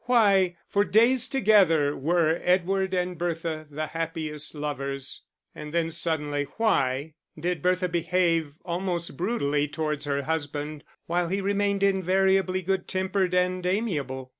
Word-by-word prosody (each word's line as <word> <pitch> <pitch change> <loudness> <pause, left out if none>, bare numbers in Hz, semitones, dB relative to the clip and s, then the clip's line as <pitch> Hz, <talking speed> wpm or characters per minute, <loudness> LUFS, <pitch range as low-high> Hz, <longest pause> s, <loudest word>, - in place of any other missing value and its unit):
Why 200 -7 +4
for 200 - +2
days 235 +5 +3
together 190 - +4
were 165 +2 +1
Edward 190 +1 +1
and 180 -2 -1
Bertha 165 -2 -3
the 155 +1 -3
happiest 155 -1 -4
lovers, 140 -2 -4 0.3
and 150 0 -8
then 165 -1 +1
suddenly 150 -3 -1
why 145 - +1 0.3
did 175 -1 -2
Bertha 180 +1 +1
behave 170 -3 0
almost 175 -2 -2
brutally 150 - 0
towards 150 0 -3
her 140 -1 -1
husband, 150 -1 -3 0.2
while 175 +1 0
he 195 +3 -1
remained 200 0 0
invariably 190 0 +2
good 190 +1 -1
tempered 185 -1 0
and 180 0 +1
amiable? 150 - -2
170 Hz, 130 wpm, -26 LUFS, 150-190 Hz, 0.3 s, Why